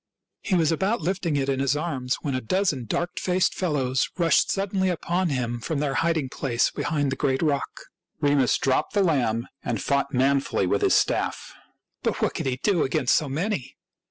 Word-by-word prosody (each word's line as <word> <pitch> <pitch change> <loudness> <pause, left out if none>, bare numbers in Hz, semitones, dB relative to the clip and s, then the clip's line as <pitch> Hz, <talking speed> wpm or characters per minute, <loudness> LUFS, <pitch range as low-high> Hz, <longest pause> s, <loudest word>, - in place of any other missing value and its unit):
He 190 - 0
was 165 -3 +3
about 195 +7 0
lifting 175 -2 -1
it 135 -1 0
in 135 -1 0
his 140 +1 +1
arms, 135 -6 -2
when 140 - -2
a 130 - -1
dozen 150 - 0
dark 175 - -2
faced 185 0 +1
fellows 135 -7 0
rushed 170 -2 +3
suddenly 195 -1 0
upon 175 +1 -1
him 120 -4 -2
from 155 +6 -3
their 140 -1 -1
hiding 165 -2 +1
place 125 -3 0
behind 145 -4 -1
the - - -1
great 135 +3 0
rock. 145 -3 0 0.5
Remus 145 -3 +3
dropped 130 - 0
the 205 -1 +3
lamb 120 -9 +1 0.2
and - - -2
fought 140 -1 0
manfully 135 -5 +1
with 100 +2 +1
his - - +4
staff. - - 0 0.5
But - - -1
what - - 0
could - - -3
he 130 - 0
do 180 +3 +1
against 130 -2 +2
so 150 - 0
many 165 - -3
145 Hz, 185 wpm, -25 LUFS, 130-175 Hz, 0.5 s, his